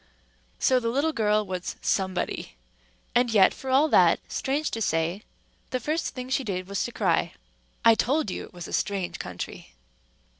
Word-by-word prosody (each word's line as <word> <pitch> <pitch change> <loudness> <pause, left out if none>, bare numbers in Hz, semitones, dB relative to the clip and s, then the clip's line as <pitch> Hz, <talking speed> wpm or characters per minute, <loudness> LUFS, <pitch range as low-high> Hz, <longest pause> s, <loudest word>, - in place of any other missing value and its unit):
So 255 -1 +3
the 230 -1 -1
little 285 +6 +1
girl 215 -3 +2
was 185 -2 -4
Somebody; 185 - -1 0.6
and 245 0 +3
yet 205 -4 +5
for 265 - -7
all 270 +4 +5
that, - - +5
strange 285 +3 -1
to 225 - -3
say, 165 +1 0 0.5
the 255 - -1
first 310 +7 -2
thing 255 -1 -5
she 265 - +1
did 185 -5 -3
was 200 0 -1
to - - -5
cry. - - +1 0.5
I 230 - +9
told 245 +1 +1
you - - -4
it - - -17
was 175 -1 -8
a - - -9
strange 195 -3 -1
country. 90 -8 -7
220 Hz, 175 wpm, -26 LUFS, 185-260 Hz, 0.6 s, I